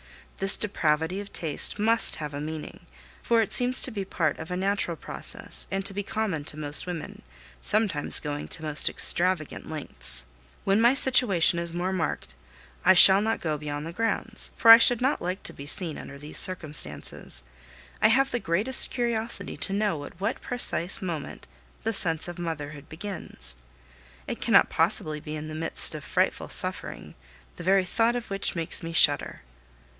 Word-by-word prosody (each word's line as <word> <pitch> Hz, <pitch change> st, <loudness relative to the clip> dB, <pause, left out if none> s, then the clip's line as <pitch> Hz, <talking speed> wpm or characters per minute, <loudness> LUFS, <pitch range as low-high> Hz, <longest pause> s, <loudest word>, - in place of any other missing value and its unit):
This 195 Hz, 0 st, +5 dB
depravity 160 Hz, -2 st, 0 dB
of 200 Hz, 0 st, -8 dB
taste 160 Hz, +3 st, -2 dB
must 225 Hz, +2 st, +2 dB
have 150 Hz, -2 st, -6 dB
a 145 Hz, -, -5 dB
meaning, 155 Hz, 0 st, -7 dB, 0.3 s
for 230 Hz, -1 st, +2 dB
it 210 Hz, -, -6 dB
seems 250 Hz, +1 st, +2 dB
to 260 Hz, -, +1 dB
be 205 Hz, -3 st, -4 dB
part 165 Hz, -5 st, -1 dB
of 160 Hz, -, -8 dB
a 180 Hz, -, -3 dB
natural 190 Hz, -3 st, -1 dB
process -, -, -2 dB
and 195 Hz, 0 st, -3 dB
to 200 Hz, -, 0 dB
be 205 Hz, -, -2 dB
common 200 Hz, -6 st, -3 dB
to 150 Hz, -, -2 dB
most 150 Hz, +2 st, +1 dB
women, 170 Hz, -4 st, -6 dB, 0.4 s
sometimes 205 Hz, -9 st, +2 dB
going 145 Hz, -1 st, -5 dB
to 165 Hz, -, -3 dB
most 150 Hz, -1 st, +1 dB
extravagant 175 Hz, -3 st, +2 dB
lengths. 65 Hz, -, -2 dB, 0.4 s
When 195 Hz, +3 st, +2 dB
my 240 Hz, +3 st, +5 dB
situation 220 Hz, -11 st, +4 dB
is 170 Hz, 0 st, -3 dB
more 180 Hz, +2 st, -1 dB
marked, 180 Hz, -3 st, -3 dB, 0.5 s
I 185 Hz, +1 st, +6 dB
shall 190 Hz, +2 st, +9 dB
not 220 Hz, +1 st, -1 dB
go 155 Hz, -3 st, -2 dB
beyond 145 Hz, 0 st, -5 dB
the 165 Hz, -, -7 dB
grounds, 225 Hz, +1 st, -2 dB
for 225 Hz, -, +8 dB
I 230 Hz, -, +11 dB
should 240 Hz, 0 st, +4 dB
not 265 Hz, +3 st, 0 dB
like 180 Hz, +2 st, -4 dB
to -, -, -5 dB
be 140 Hz, -, -10 dB
seen 165 Hz, -1 st, -3 dB
under 140 Hz, -, -10 dB
these 150 Hz, +2 st, -4 dB
circumstances. 145 Hz, -, -5 dB, 0.6 s
I -, -, +6 dB
have 270 Hz, +5 st, +3 dB
the 245 Hz, -, -1 dB
greatest 215 Hz, +9 st, 0 dB
curiosity 235 Hz, -2 st, -2 dB
to 195 Hz, -, 0 dB
know 200 Hz, -7 st, -1 dB
at 175 Hz, -, -13 dB
what 200 Hz, -, -2 dB
precise 200 Hz, -7 st, 0 dB
moment 165 Hz, -, -6 dB, 0.4 s
the 225 Hz, -, -1 dB
sense 165 Hz, -5 st, 0 dB
of 175 Hz, 0 st, -8 dB
motherhood 150 Hz, -4 st, -6 dB
begins. 185 Hz, -, -6 dB, 0.7 s
It -, -, -6 dB
cannot -, -, +4 dB
possibly 155 Hz, -1 st, +1 dB
be 150 Hz, +1 st, -7 dB
in 155 Hz, 0 st, -6 dB
the 155 Hz, -, -7 dB
midst 160 Hz, +1 st, 0 dB
of -, -, -7 dB
frightful -, -, -1 dB
suffering, -, -, -5 dB, 0.4 s
the -, -, -8 dB
very 190 Hz, +1 st, +3 dB
thought 230 Hz, +5 st, +1 dB
of 240 Hz, -4 st, -5 dB
which 195 Hz, -1 st, 0 dB
makes 165 Hz, -2 st, -2 dB
me 165 Hz, -, -6 dB
shudder. 145 Hz, -, +2 dB
180 Hz, 180 wpm, -26 LUFS, 155-210 Hz, 0.7 s, I